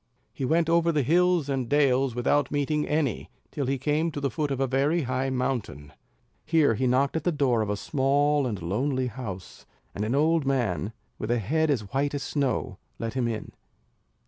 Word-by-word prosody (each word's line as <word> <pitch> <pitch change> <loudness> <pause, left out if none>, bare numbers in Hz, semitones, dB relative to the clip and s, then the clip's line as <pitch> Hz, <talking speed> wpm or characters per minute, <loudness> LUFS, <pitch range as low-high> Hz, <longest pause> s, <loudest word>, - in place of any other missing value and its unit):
He 135 - -3
went 165 +4 +2
over 170 0 +3
the 150 -3 +1
hills 175 +1 +3
and 130 -4 -2
dales 135 -3 +2
without 130 +3 +1
meeting 150 +1 0
any, 150 -7 -1 0.2
till 140 -3 -3
he 135 +1 0
came 150 +5 0
to 145 - -5
the 140 -2 -1
foot 150 -3 -2
of 135 -2 -2
a 135 - +2
very 140 +6 +1
high 130 +1 -1
mountain. 120 - -3 0.5
Here 155 -5 +3
he 130 +4 0
knocked 135 +4 +2
at 160 - -1
the 175 - +2
door 135 -7 +1
of 105 - -2
a 105 - -1
small 145 +3 +1
and 105 -5 -3
lonely 130 +9 0
house; 105 -6 -8 0.3
and 105 - -3
an 115 +5 0
old 160 +2 +3
man, 115 - 0 0.3
with 110 - -4
a 120 - +2
head 155 +9 0
as 110 -9 -1
white 140 +2 0
as 140 - -3
snow, 130 -9 -2 0.2
let 115 -1 -4
him 125 -2 0
in. 110 -2 -4
135 Hz, 200 wpm, -26 LUFS, 120-150 Hz, 0.5 s, over